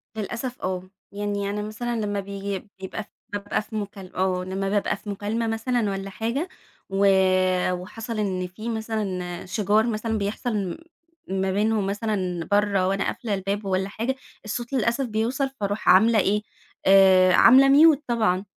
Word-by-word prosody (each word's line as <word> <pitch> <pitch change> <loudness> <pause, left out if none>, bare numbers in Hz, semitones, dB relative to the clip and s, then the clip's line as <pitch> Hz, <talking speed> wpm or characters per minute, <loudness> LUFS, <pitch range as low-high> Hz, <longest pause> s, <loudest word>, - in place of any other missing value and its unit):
للأسف 235 +4 -4
آه. 185 -1 -2 0.3
يعني 205 0 -2
أنا 205 +1 -2
مثلًا 215 +3 -4
لمّا 205 -1 -1
بييجي 200 0 -5
بيبقى 190 +3 -6 0.3
بابقى 205 0 -1
في 220 +1 -10
مكال 200 -3 -6
آه 185 -1 0
لمّا 195 +1 -3
بابقى 205 0 0
في 210 - -10
مكالمة 210 +3 -2
مثلًا 225 -1 0
والّا 195 0 -4
حاجة، 235 - -2 0.4
و 195 +1 +1 0.7
وحصل 215 +5 -5
إن 185 -3 -1
في 215 +6 -7
مثلًا 205 -6 -3
شِجار 210 +3 +2
مثلًا 220 0 -1
بيحصل 215 +4 -2
م 190 -4 -3 0.6
ما 190 0 0
بينهم 210 +1 +1
مثلًا 195 -5 -2
برّه 200 -2 +2
وأنا 195 0 0
قافلة 225 -4 -3
الباب 200 +1 -2
والّا 190 0 0
حاجة، 230 +6 -2 0.3
الصوت 235 +4 -4
للأسف 255 +1 +1
بيوصل 240 +5 -1
فاروح 205 +1 -1
عاملة 220 +4 +6
إيه، 205 +2 +2 0.4
آآ 190 -1 +6
عاملة 265 +7 +7 0.3
mute - - -14
طبعًا، 215 -6 +1
205 Hz, 150 wpm, -24 LUFS, 195-225 Hz, 0.7 s, عاملة